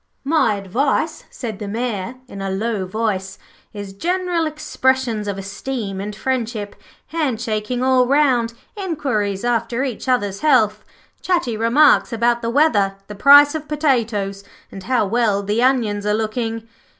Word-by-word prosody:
'My 275 -7 +2
advice,' 270 - -1
said 220 -5 -6
the 210 - -5
Mayor 225 0 -3
in 200 -5 -8
a 195 - -3
low 200 0 -2
voice, 190 -2 -2 0.3
'is 205 -2 -8
general 350 - -1
expressions 260 -7 -1
of 200 -1 -3
esteem 195 0 -5
and 205 +1 -5
friendship, 230 -4 -3 0.3
hand 295 -9 -1
shaking 230 +2 -2
all 255 -1 +3
round, 255 -5 +2 0.2
inquiries 260 - -2
after 240 +1 0
each 260 -1 -4
other's 205 -6 0
health, 220 -8 +3 0.4
chatty 340 -11 0
remarks 240 +8 +4
about 235 +1 +1
the 230 - -2
weather, 225 -8 +2
the 210 - -9
price 285 +7 +7
of 310 -1 -5
potatoes, 230 -10 0 0.3
and 195 - -8
how 245 -3 +2
well 210 -1 +1
the 210 +4 0
onions 235 -6 +1
are 210 - +2
looking.' 225 +1 -3
230 Hz, 145 wpm, -20 LUFS, 205-265 Hz, 0.4 s, price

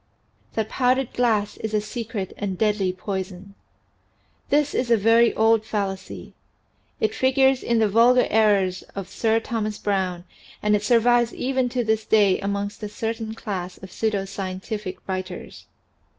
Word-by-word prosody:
THAT 220 -1 -2
POWDERED 255 0 +1
GLASS 220 -4 +1
IS 220 -1 -3
A - - +3
SECRET 215 -3 -5
AND 195 -3 -4
DEADLY 205 -3 +1
POISON 190 0 -5 1.0
HIS 290 0 +2
is 245 - -1
a 230 - +5
very 225 +3 +5
old 225 0 +4
fallacy. 200 -3 -4 0.7
It 215 0 +1
figures 265 +2 +3
in 235 - +1
the 220 -1 +3
"Vulgar 235 +4 +5
Errors" 200 -4 +3
of 195 -2 -5
Sir 225 0 +1
Thomas 215 -2 -3
Browne 190 -3 -1 0.4
and 210 0 +3
it 205 - 0
survives 235 +2 +3
even 260 -1 0
to 245 0 -1
this 220 -1 0
day 205 -3 +3
amongst 200 +1 -3
a 210 - -4
certain 225 +1 -4
class 185 -5 -5
of 190 - -11
pseudo 210 -3 -1
scientific 195 +1 -5
writers. 185 -1 -6
215 Hz, 150 wpm, -23 LUFS, 195-230 Hz, 1.0 s, a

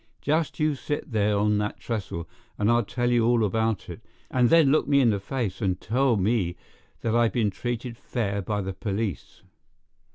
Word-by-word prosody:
Just 155 +2 0
you 155 -1 +2
sit 145 +1 -4
there 105 -2 +2
on 105 0 +2
that 105 0 -3
trestle, 95 -7 -4 0.3
and 105 +2 +2
I'll 120 0 +3
tell 120 +4 -1
you 120 -1 +3
all 115 -1 +3
about 110 -3 -1
it, 90 +5 -8 0.3
and 125 -2 +3
then 160 -5 +5
look 155 - +2
me 140 -1 +4
in 120 -4 +4
the 100 - -1
face 100 -2 -3
and 95 -3 0
tell 125 +1 +1
me 95 -3 +1 0.5
that 115 0 0
I've 120 -1 +3
been 110 -5 +1
treated 120 +3 -4
fair 100 -5 -2
by 105 +1 -2
the 95 0 -4
police." 100 -1 -4
115 Hz, 190 wpm, -26 LUFS, 100-120 Hz, 0.5 s, then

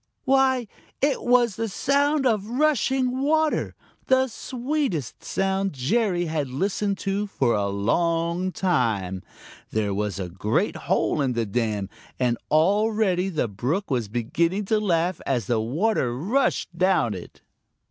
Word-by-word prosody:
Why, 265 -3 +3 0.3
it 280 0 +1
was 240 -4 +3
the 225 -1 -2
sound 280 +5 +1
of 215 -5 +1
rushing 260 -1 +1
water, 310 +2 +1 0.3
the 260 0 +4
sweetest 250 - -3
sound 195 -1 -1
Jerry 175 - +1
had 155 -4 -2
listened 195 +7 -1
to 200 +1 -1
for 130 -11 +1
a 100 -1 0
long 170 - 0
time. 110 - 0 0.5
There 105 -2 -1
was 100 0 -2
a 95 - -3
great 95 +5 -1
hole - - 0
in 130 -2 +1
the 115 -1 -1
dam, 105 -2 -1 0.3
and 120 -2 +1
already 195 +2 +2
the 155 -9 -1
brook 140 - -2
was 120 -5 0
beginning 165 - -1
to 215 - +4
laugh 180 -3 0
as 125 -6 0
the 115 +2 +1
water 125 - 0
rushed 200 - 0
down 175 - +2
it. 90 -3 -10
180 Hz, 135 wpm, -24 LUFS, -, 0.5 s, the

